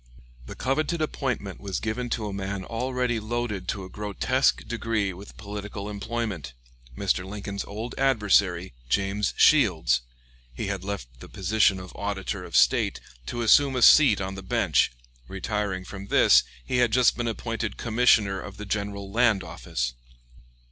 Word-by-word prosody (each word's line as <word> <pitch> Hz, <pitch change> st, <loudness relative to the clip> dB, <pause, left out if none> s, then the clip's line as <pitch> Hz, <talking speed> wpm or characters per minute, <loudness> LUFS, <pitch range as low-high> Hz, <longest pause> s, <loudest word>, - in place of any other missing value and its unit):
The -, -, -8 dB
coveted 155 Hz, +5 st, -1 dB
appointment 130 Hz, -10 st, -3 dB
was 100 Hz, -2 st, -3 dB
given 120 Hz, +3 st, -3 dB
to 110 Hz, -2 st, -2 dB
a 105 Hz, -, -4 dB
man 100 Hz, -1 st, -4 dB
already 125 Hz, 0 st, -1 dB
loaded 110 Hz, -4 st, -3 dB
to 100 Hz, -, -3 dB
a -, -, -7 dB
grotesque 105 Hz, +7 st, 0 dB
degree 115 Hz, -4 st, -1 dB
with 100 Hz, +3 st, -12 dB
political 105 Hz, -1 st, -6 dB
employment 100 Hz, -, -4 dB, 0.4 s
Mr. 95 Hz, -2 st, 0 dB
Lincoln's 100 Hz, 0 st, -5 dB
old 110 Hz, +4 st, -6 dB
adversary, 100 Hz, -, +2 dB, 0.2 s
James 100 Hz, +6 st, 0 dB
Shields, -, -, +4 dB, 0.5 s
He -, -, -3 dB
had 95 Hz, -2 st, -3 dB
left 65 Hz, -12 st, -6 dB
the -, -, -11 dB
position 105 Hz, -3 st, +2 dB
of 90 Hz, -1 st, -9 dB
Auditor 100 Hz, -1 st, -3 dB
of -, -, -1 dB
State -, -, +3 dB, 0.3 s
to 120 Hz, -1 st, -3 dB
assume 135 Hz, +4 st, +5 dB
a 125 Hz, -, +2 dB
seat 135 Hz, -8 st, +7 dB
on 95 Hz, 0 st, -3 dB
the 95 Hz, -, -7 dB
Bench; 95 Hz, -, +2 dB, 0.4 s
retiring 100 Hz, -, -3 dB
from 100 Hz, 0 st, -8 dB
this, -, -, +6 dB, 0.2 s
he 125 Hz, -, -1 dB
had 120 Hz, -2 st, +3 dB
just 125 Hz, +1 st, +4 dB
been 120 Hz, 0 st, -2 dB
appointed 115 Hz, -2 st, -3 dB
Commissioner 110 Hz, -4 st, +3 dB
of 100 Hz, -1 st, -9 dB
the 105 Hz, -, -7 dB
General 100 Hz, -1 st, -3 dB
Land 110 Hz, -3 st, +3 dB
Office. -, -, -4 dB
105 Hz, 155 wpm, -26 LUFS, 95-115 Hz, 0.5 s, seat